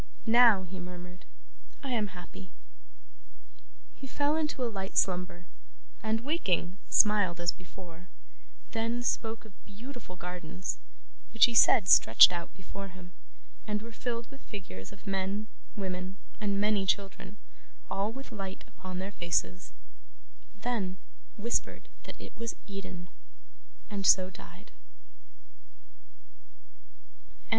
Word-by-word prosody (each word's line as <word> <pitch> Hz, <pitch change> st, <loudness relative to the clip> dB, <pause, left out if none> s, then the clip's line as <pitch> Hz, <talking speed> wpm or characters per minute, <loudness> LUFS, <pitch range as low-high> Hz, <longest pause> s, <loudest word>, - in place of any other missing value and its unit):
'Now,' 230 Hz, -4 st, +7 dB
he 185 Hz, +1 st, -7 dB
murmured, 180 Hz, 0 st, -9 dB, 0.6 s
'I 275 Hz, -, -3 dB
am 220 Hz, -4 st, +1 dB
happy.' 185 Hz, +1 st, -10 dB, 1.4 s
He 270 Hz, -, -9 dB
fell 290 Hz, +3 st, +1 dB
into 300 Hz, -4 st, -1 dB
a -, -, +2 dB
light 190 Hz, -1 st, -4 dB
slumber, 180 Hz, -1 st, +1 dB, 0.6 s
and 220 Hz, +1 st, 0 dB
waking 200 Hz, -, 0 dB
smiled 205 Hz, -5 st, +4 dB
as 175 Hz, 0 st, +2 dB
before; 180 Hz, -1 st, -13 dB, 0.6 s
then, 230 Hz, +2 st, -1 dB
spoke 225 Hz, -2 st, -1 dB
of 215 Hz, -, -14 dB
beautiful 235 Hz, -2 st, -10 dB
gardens, 180 Hz, 0 st, -5 dB, 0.6 s
which 225 Hz, -, +9 dB
he 240 Hz, -, -1 dB
said 215 Hz, -3 st, +7 dB
stretched 115 Hz, +2 st, +9 dB
out 175 Hz, -1 st, -4 dB
before 195 Hz, +1 st, -7 dB
him, 180 Hz, -1 st, -12 dB, 0.6 s
and 210 Hz, 0 st, -1 dB
were 230 Hz, -, -8 dB
filled 235 Hz, 0 st, -3 dB
with 275 Hz, -, -13 dB
figures 95 Hz, -, -8 dB
of 200 Hz, -, -15 dB
men, 195 Hz, +2 st, -1 dB, 0.3 s
women, 185 Hz, -1 st, -4 dB, 0.2 s
and 200 Hz, -2 st, 0 dB
many 205 Hz, -2 st, +2 dB
children, 195 Hz, 0 st, -1 dB, 0.5 s
all 200 Hz, +3 st, 0 dB
with 270 Hz, +2 st, -9 dB
light 195 Hz, -4 st, -6 dB
upon 185 Hz, -1 st, -8 dB
their 190 Hz, +2 st, -4 dB
faces; 180 Hz, 0 st, -1 dB, 0.9 s
then, 210 Hz, -6 st, -1 dB, 0.4 s
whispered 235 Hz, +3 st, -1 dB, 0.2 s
that -, -, -9 dB
it -, -, -10 dB
was 230 Hz, 0 st, -4 dB
Eden 190 Hz, -3 st, -7 dB, 0.8 s
and 200 Hz, -3 st, -1 dB
so 185 Hz, -1 st, +6 dB
died. -, -, -13 dB
195 Hz, 120 wpm, -31 LUFS, 180-225 Hz, 1.4 s, which